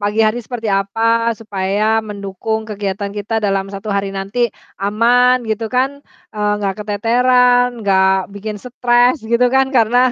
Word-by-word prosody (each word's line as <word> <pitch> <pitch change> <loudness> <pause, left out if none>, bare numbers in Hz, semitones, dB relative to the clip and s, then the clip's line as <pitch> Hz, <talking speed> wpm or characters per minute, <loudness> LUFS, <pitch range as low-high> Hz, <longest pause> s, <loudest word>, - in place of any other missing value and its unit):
pagi 205 +2 0
hari 215 +3 0
seperti 230 -2 -5
apa 195 +3 -5 0.4
supaya 200 -1 -2 0.2
mendukung 200 +2 -4
kegiatan 200 -1 -4
kita 205 +2 -4
dalam 195 -1 0
1 200 +2 -7
hari 200 0 -1
nanti 195 +5 -5 0.4
aman 240 +5 +3
gitu 220 +1 -2
kan, 260 +2 +2 0.4
eee, 210 -1 0
gak 195 -1 -1
keteteran, 245 +4 +3 0.2
gak 190 -1 +3
bikin 210 +1 -5
stress 245 +1 +2 0.2
gitu 240 +1 +4
kan. 265 0 +4
Karena 235 +1 +3
215 Hz, 140 wpm, -17 LUFS, 200-245 Hz, 0.4 s, gitu